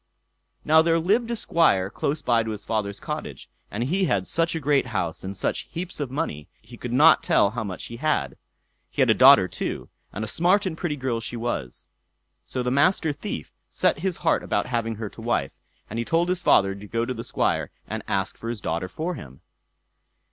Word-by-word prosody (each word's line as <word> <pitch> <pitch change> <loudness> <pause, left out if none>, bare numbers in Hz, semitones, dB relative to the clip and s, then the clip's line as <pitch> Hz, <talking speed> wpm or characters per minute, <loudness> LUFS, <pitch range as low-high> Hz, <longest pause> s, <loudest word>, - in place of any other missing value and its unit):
Now 160 +1 +6
there 165 0 +3
lived 210 +8 +1
a 235 - 0
Squire 100 - +2
close 145 +5 -2
by 120 -2 +3
to 110 - -4
his 105 -2 -6
father's 100 -2 -2
cottage, - - -6 0.2
and 110 +4 -3
he 185 +9 +1
had 100 - +1
such 165 - 0
a - - -1
great 140 -3 +2
house, 85 -8 -3
and 95 +1 -5
such - - -2
heaps 175 0 -5
of 145 -3 -2
money, 130 - -3
he 115 +2 -14
could 120 0 -6
not 145 +6 +6
tell 100 - +3
how 115 0 -3
much 95 -3 -6
he 115 - -8
had. 115 - 0 0.5
He - - +2
had - - +4
a - - +6
daughter - - +7
too, - - -4 0.2
and 105 - -4
a - - -3
smart 180 - +2
and 180 -4 -2
pretty 160 -2 -2
girl 130 -4 -2
she 115 +1 -5
was. 115 - -4 0.6
So 125 - -3
the 125 - 0
Master 150 +3 +3
Thief 110 - -6 0.2
set - - +1
his 185 0 -1
heart 160 - +3
upon 100 - -1
having 115 -2 -2
her 110 0 -5
to 115 - -12
wife, 110 - 0 0.4
and 115 - -5
he - - 0
told 165 +7 +1
his 180 -1 0
father 95 0 +4
to 100 +1 -10
go 115 +2 -1
to 130 - -3
the 115 -1 -6
Squire - - 0 0.2
and - - -4
ask 95 -1 -1
for 115 - -5
his 120 -2 -4
daughter 85 -1 -2
for 160 - -3
him. 65 - -11
120 Hz, 215 wpm, -25 LUFS, 105-160 Hz, 0.6 s, daughter